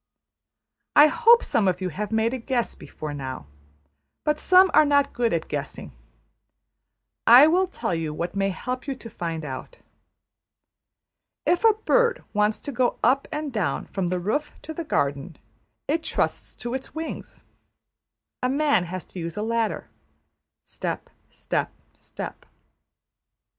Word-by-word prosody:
I 295 - +9
hope 470 +8 +5
some 200 - +1
of 180 -1 +1
you 185 -1 -2
have 205 +6 -4
made 225 +2 +1
a 260 - -3
guess 240 0 -1
before 150 -1 -8
now; 130 - -6 0.8
but 300 0 +1
some 370 +1 +6
are 305 - +7
not 285 -1 +2
good 235 -2 +1
at 165 -1 -1
guessing. 145 -2 -5 1.4
I 245 +5 +10
will 360 +4 +3
tell 355 - -3
you 165 -2 -2
what 170 +5 -4
may 195 0 +1
help 250 +8 -5
you 275 - -2
to 230 - -10
find 165 -2 -4
out. 140 - -7 1.7
If 350 +3 +2
a 450 -1 +7
bird 475 +2 +2
wants 210 0 +2
to 285 - -5
go 250 -1 +1
up 265 +3 +3
and 300 -3 -4
down 180 -11 -1
from 190 -3 -3
the 180 +1 0
roof 255 +12 -2
to 315 - -6
the 335 - -4
garden, 145 - -1 0.5
it 320 +3 +1
trusts - - -2
to 240 0 -5
its 265 +2 -6
wings. 320 0 -6 1.0
A 250 - +1
man 280 -8 +2
has 180 0 -6
to 185 - -10
use 165 +1 -5
a 210 - -1
ladder: 230 -1 -1 0.8
step, - - -5 0.2
step, - - -2 0.2
step. - - -8
230 Hz, 150 wpm, -25 LUFS, 180-300 Hz, 1.7 s, I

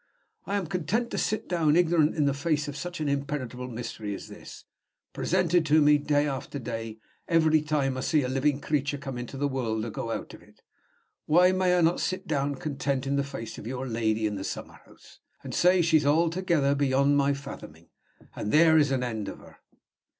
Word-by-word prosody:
If - - -35
I 200 - -1
am 195 - -2
content 195 +8 -2
to - - -2
sit 215 +1 -1
down 160 -4 +2
ignorant 165 -3 +3
in 150 -3 +1
the 140 - +2
face 150 +1 -1
of 145 - -5
such 175 +3 -6
an 150 - -1
impenetrable 140 -3 -3
mystery 115 -4 -5
as - - -10
this - - -12 0.5
presented 180 -1 +1
to 155 +1 +5
me, 150 0 +5
day 145 0 +1
after 140 0 -4
day, 115 -3 -5 0.3
every 160 -2 +3
time 145 -3 0
I - - -4
see 150 +2 +1
a - - -1
living 135 +2 0
creature 145 -1 -1
come 135 -2 -6
into 125 +2 -7
the 145 +1 0
world 115 -5 -2
or 115 - -5
go 115 - -5
out - - -5
of - - -12
it - - -23 0.6
why 180 +4 +5
may 185 -1 +2
I - - +3
not 165 +1 +2
sit 185 - -2
down 140 -2 -1
content 140 -1 -2
in 140 +1 0
the 140 - +1
face 115 -5 -7
of 105 - -8
your 130 +1 -4
lady 110 -2 0
in 105 -1 -1
the 95 - -5
summer - - -6
house, - - -19 0.2
and - - -7
say 180 0 +4
she's 160 -2 +3
altogether 165 -1 +2
beyond 140 0 +2
my 140 0 +2
fathoming, 85 - -10 0.5
and 105 - -3
there 160 0 +6
is 145 -2 +3
an 130 -2 0
end 110 -4 -3
of - - -6
her?" - - -17
145 Hz, 210 wpm, -27 LUFS, 130-160 Hz, 0.6 s, there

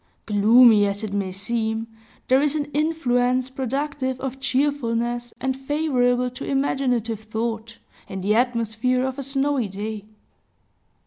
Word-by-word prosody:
Gloomy 215 0 +6
as 200 +2 -3
it 210 -2 -4
may 195 -2 -1
seem, 220 +3 -2 0.4
there 260 +2 +4
is 295 0 +1
an 295 -1 -2
influence 255 -5 +1
productive 265 0 -2
of 265 0 -5
cheerfulness, 240 -3 -1
and 265 0 -1
favorable 260 -3 +1
to 250 - -8
imaginative 250 -5 0
thought, 225 +1 -4 0.3
in 190 0 -5
the 200 +3 +2
atmosphere 240 +1 +1
of 265 +1 -4
a - - -2
snowy 275 -2 0
day. 205 +2 -6
245 Hz, 130 wpm, -23 LUFS, 220-270 Hz, 0.4 s, Gloomy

